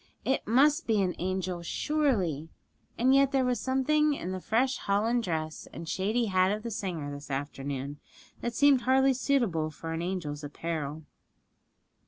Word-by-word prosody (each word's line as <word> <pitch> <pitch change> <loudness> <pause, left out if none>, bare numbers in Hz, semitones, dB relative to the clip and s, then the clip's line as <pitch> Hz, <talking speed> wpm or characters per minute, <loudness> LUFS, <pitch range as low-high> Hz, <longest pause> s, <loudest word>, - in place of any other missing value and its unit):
It 265 - 0
must 290 +8 +4
be 220 -2 +3
an 180 -1 0
angel, 185 -1 -2
surely! 185 - 0 0.5
and 255 +3 +4
yet 275 0 +5
there 265 -2 +2
was 250 -2 +1
something 290 +4 +2
in 185 -8 -5
the 185 - -3
fresh 255 +7 +1
holland 220 +5 +1
dress 160 -5 -3
and 165 - -8
shady 215 +8 0
hat 185 -2 +3
of 210 +1 -3
the 235 - -4
singer 170 -8 -3
this 145 +1 -9
afternoon 140 0 -4 0.4
that 235 -1 -3
seemed 285 -2 +5
hardly 265 +2 +4
suitable 235 - +1
for 165 +1 -6
an 165 - -3
angel's 170 -5 -3
apparel. 155 0 -4
195 Hz, 160 wpm, -29 LUFS, 160-260 Hz, 0.5 s, yet